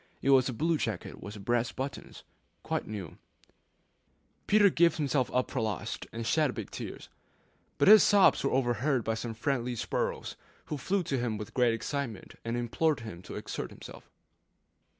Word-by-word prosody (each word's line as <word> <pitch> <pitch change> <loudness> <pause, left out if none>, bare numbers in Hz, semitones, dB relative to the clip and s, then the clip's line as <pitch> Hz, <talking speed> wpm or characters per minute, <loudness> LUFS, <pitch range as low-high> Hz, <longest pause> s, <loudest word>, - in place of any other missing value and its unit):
It 140 - +3
was 130 -1 +5
a - - -3
blue 160 +5 +1
jacket - - -4
with 100 0 -8
brass 120 0 +1
buttons, 135 +2 -6 0.4
quite - - -2
new. 100 -7 -7 1.3
Peter 205 -2 +6
gave 170 +1 +4
himself 140 -4 +1
up 125 0 0
for 130 - -1
lost, 110 -5 -3
and 115 0 -5
shed 150 +1 +2
big 110 -4 -6
tears; - - -7 0.7
but - - +3
his 215 +1 +10
sobs 200 -2 +5
were 140 - +2
overheard 125 0 +1
by 110 - 0
some 115 0 -4
friendly 125 0 -1
sparrows, - - -2 0.3
who 150 - -4
flew 190 +7 0
to 135 -5 -1
him 120 -2 -1
in 105 - -4
great 120 -3 +3
excitement, 125 -2 -4
and 115 +1 -2
implored 125 +4 0
him 110 -6 -8
to - - -9
exert - - -5
himself. - - -12
125 Hz, 170 wpm, -30 LUFS, 115-145 Hz, 1.3 s, his